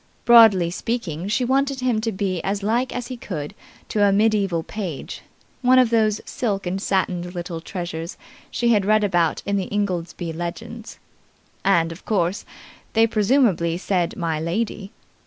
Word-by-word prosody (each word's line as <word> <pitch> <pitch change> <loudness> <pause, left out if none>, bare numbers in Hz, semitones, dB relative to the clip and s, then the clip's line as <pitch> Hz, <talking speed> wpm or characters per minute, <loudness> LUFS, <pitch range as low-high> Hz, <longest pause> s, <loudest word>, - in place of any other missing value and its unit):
Broadly 220 -8 +7
speaking, 190 -5 -3
she 235 +5 0
wanted 270 +1 +1
him 245 -4 +1
to 225 0 -1
be 185 -3 -2
as 200 +1 -2
like 235 +5 0
as 245 - -4
he 255 - -5
could 155 -10 -6 0.4
to 210 - +1
a 200 - +5
medieval 200 -5 +2
page, 180 -9 -6 0.4
one 255 0 +5
of 250 -3 +4
those 215 -2 +2
silk 200 -6 -2
and 180 +2 -2
satined 180 -2 -1
little 175 -1 -5
treasures 170 -1 -6 0.3
she 235 - 0
had 210 -4 +4
read 215 +2 +3
about 175 -5 +1
in 200 0 0
the 190 - -3
Ingoldsby 175 -4 -2
Legends. 220 +7 -7 0.7
And, 170 -4 +3
of 165 - -10
course, 190 -2 -1 0.5
they 225 0 +5
presumably 210 - +2
said 180 -2 -1
'my 165 -3 -1
lady'. 195 +4 -3
200 Hz, 155 wpm, -22 LUFS, 175-225 Hz, 0.7 s, Broadly